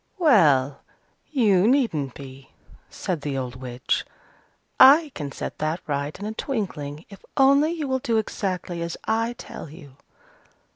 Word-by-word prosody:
"Well, 150 - +4 0.5
you 210 -9 +3
needn't 200 - +1
be," 135 -1 -11 0.4
said 175 -5 -4
the 140 -2 -3
old 125 -1 -4
witch. 125 0 -2 0.8
"I 290 +3 +8
can 145 -3 -5
set - - -6
that 155 +3 -1
right 145 0 -3
in 205 - -6
a 215 - -4
twinkling, 170 - -4
if 200 - -14
only 280 +4 +4
you 310 -4 -4
will 260 0 0
do 230 -2 0
exactly 185 -5 -3
as 170 0 -4
I 225 +2 0
tell 195 - -9
you. 140 -3 -14
180 Hz, 145 wpm, -24 LUFS, -, 0.8 s, I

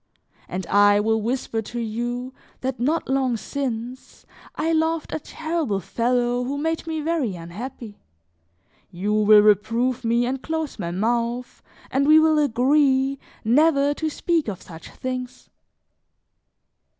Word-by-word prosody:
And 185 0 -4
I 205 +2 +5
will 220 +1 +1
whisper 230 -1 -2
to 240 +3 -6
you 240 +3 -3 0.3
that 260 0 -3
not 305 +7 0
long 265 -3 +1
since, 250 -1 -5 0.3
I 325 - 0
loved 320 0 0
a - - -1
terrible 315 - -2
fellow 245 +3 0
who 275 +3 -3
made 325 +2 -2
me 320 -1 -2
very 300 - -1
unhappy; 205 +6 -8 0.9
you 195 +3 -2
will 215 0 +6
reprove 230 +4 +2
me 235 +1 +2
and 260 +1 -2
close 320 -5 -4
my 170 -3 -3
mouth, 235 +6 -2 0.3
and 275 +2 +1
we 310 +1 +8
will 315 -1 +4
agree 270 0 +2 0.2
never 285 +4 +3
to 315 +2 -2
speak 330 -1 0
of 195 -4 -5
such 165 -1 -11
things." 255 0 -6
250 Hz, 135 wpm, -23 LUFS, 220-290 Hz, 0.9 s, we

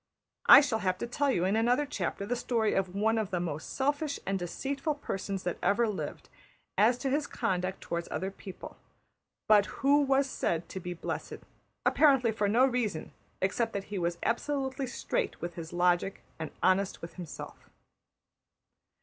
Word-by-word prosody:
I 285 - +11
shall 230 -6 0
have 185 -2 0
to - - -3
tell 280 +4 0
you 180 -9 +2
in 195 +3 +2
another 245 +6 +3
chapter 200 -6 -3
the 245 +4 -1
story 230 -3 0
of 190 -1 -1
one 220 +2 +2
of 215 -4 -2
the 180 - -1
most 160 -3 -4
selfish 285 +2 -1
and 195 0 -1
deceitful 275 - -2
persons 195 -8 -4
that 175 - -3
ever 215 +5 +3
lived, 210 -3 -5 0.5
as 235 +4 +4
to 270 +1 -2
his 290 +2 0
conduct 185 0 -2
towards 170 0 -3
other 190 +1 -3
people, 190 -1 -10 0.7
but 210 -1 +6
who 285 +2 +3
was 275 0 +3
said 170 -10 -1
to 190 - -5
be 180 0 -5
blessed, - - -5 0.4
apparently 270 -6 +5
for 210 -2 0
no 240 +5 +5
reason 240 -10 -1 0.3
except 225 +4 0
that 200 - -2
he 195 - -1
was 170 0 -1
absolutely 265 +2 -1
straight 420 - -2
with 175 0 -4
his 165 -1 -7
logic 175 +2 +1 0.2
and 160 - -4
honest 185 0 +2
with 170 - -7
himself. 170 -5 -9
210 Hz, 170 wpm, -30 LUFS, 185-265 Hz, 0.7 s, I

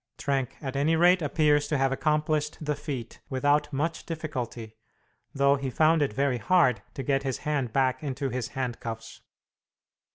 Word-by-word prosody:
Trenck 135 -3 -1
at 135 -1 -4
any 150 +4 +2
rate 175 +2 +5
appears 150 -1 +2
to 150 - 0
have 135 0 +2
accomplished 150 +1 0
the 150 -1 -1
feat 140 -6 -6
without 145 +2 +1
much 155 +4 -2
difficulty, 125 -9 -5 0.6
though 140 -1 +3
he 135 -1 -3
found 155 +4 +3
it 145 - +1
very 130 +2 0
hard, 130 - +3
to 135 - -4
get 135 +1 +1
his 135 -2 -2
hand 140 -6 0
back 130 +2 +1
into 140 -1 -3
his 125 -1 -3
handcuffs. 115 -3 -5
140 Hz, 160 wpm, -27 LUFS, 130-150 Hz, 0.6 s, rate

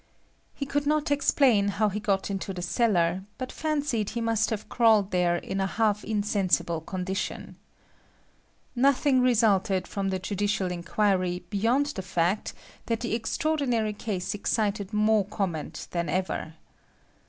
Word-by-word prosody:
He 280 - -3
could 285 +1 -1
not 300 -1 +1
explain 265 -7 +3
how 210 +1 +1
he 205 +1 -3
got 200 -1 0
into 195 0 -4
the 180 - -5
cellar, 180 -3 +1
but 255 -1 -5
fancied 290 -9 -1
he 235 - -4
must 225 -1 +1
have 215 -2 -4
crawled 220 -4 +3
there 180 -1 +2
in 195 +2 -3
a 190 - +1
half 210 0 0
insensible 200 -6 0
condition. 185 +3 -4 1.2
Nothing 265 +1 +3
resulted 205 -6 +3
from 195 -1 -2
the 190 - -1
judicial 195 0 -1
inquiry 180 0 0
beyond 230 +7 +2
the 190 - -3
fact 180 +2 -1 0.3
that 230 -1 -1
the 235 - -2
extraordinary 235 -2 0
case 205 -4 -3
excited 205 -1 -1
more 215 0 +3
comment 190 -6 -4
than 170 -2 -2
ever. 175 -2 -2
205 Hz, 140 wpm, -27 LUFS, 190-230 Hz, 1.2 s, explain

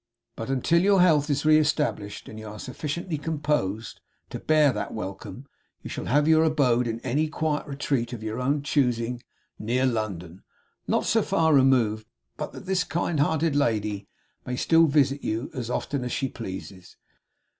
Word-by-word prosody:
But 115 - -6
until 150 +6 +2
your 195 0 +4
health 155 -4 +4
is 145 +1 0
re 155 0 +6
established, 150 -9 -1
and 110 - -9
you 110 - -8
are 105 0 -8
sufficiently 150 +7 -4
composed 145 -10 -2 0.3
to - - -5
bear 155 -3 +3
that 105 - -4
welcome, 110 +5 -7 0.4
you - - -7
shall - - -5
have 145 +4 +2
your 160 0 +5
abode 130 -6 +2
in 115 0 -3
any 145 +5 0
quiet 155 -1 -2
retreat 135 -4 -2
of 115 -3 -7
your 110 +2 -3
own 140 +3 0
choosing, 125 -4 0 0.4
near 125 +4 0
London; 100 -7 -3 0.5
not - - +1
so - - +3
far 160 -1 +2
removed 120 -6 +3 0.3
but - - -5
that - - -10
this 185 -1 +1
kind 170 -2 -2
hearted 155 +1 +1
lady 105 -7 0 0.4
may 125 - -4
still 165 +5 +4
visit 140 -1 +2
you 110 +5 -3
as 125 -5 -5
often 130 +2 -2
as 125 - -4
she 135 - -1
pleases. 95 -4 -8
135 Hz, 170 wpm, -26 LUFS, 115-150 Hz, 0.5 s, re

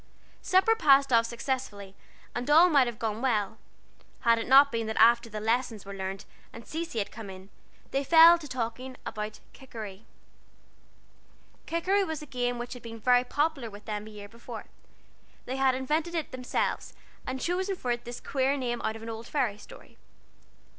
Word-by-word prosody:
Supper 380 +5 +3
passed 275 - +4
off 230 0 +4
successfully, 235 -5 -4 0.4
and 245 +3 -4
all 330 +4 +7
might 275 -4 +5
have 235 -2 -5
gone 220 0 -3
well, 220 -5 0 0.6
had 230 -1 +4
it 225 - -4
not 275 +2 +7
been 230 -1 -2
that 220 - -4
after 235 +1 +5
the 215 -1 -5
lessons 225 -1 -1
were 200 - -7
learned 195 +1 -5 0.3
and 230 - -11
Cecy 325 -5 -5
had 205 - -2
come 220 -3 -9
in, 190 +1 -11 0.4
they 275 +1 0
fell 330 +3 +8
to 305 - -9
talking 255 0 -5
about 215 0 -5
"Kikeri." 220 -6 -9 1.6
Kikeri 375 +4 +1
was 320 -5 -4
a - - -8
game 245 -3 -2
which 240 +1 -5
had 250 - -10
been 230 -1 -9
very 245 +2 +4
popular 290 -2 -1
with 205 0 -13
them 210 0 -4
a - - -9
year 205 -1 -10
before. 230 +3 -10 0.8
They 260 +2 -4
had 265 -1 +3
invented 310 +6 -1
it 320 -3 -3
themselves, 255 -1 -2 0.3
and 260 +1 -3
chosen 370 +5 -1
for 250 -8 -3
it 240 0 -2
this 240 0 -7
queer 270 +1 0
name 240 -3 -2
out 220 - -2
of 225 - -9
an 225 - -6
old 225 +1 -8
fairy 240 -8 -1
story. - - -15
245 Hz, 180 wpm, -28 LUFS, 220-275 Hz, 1.6 s, fell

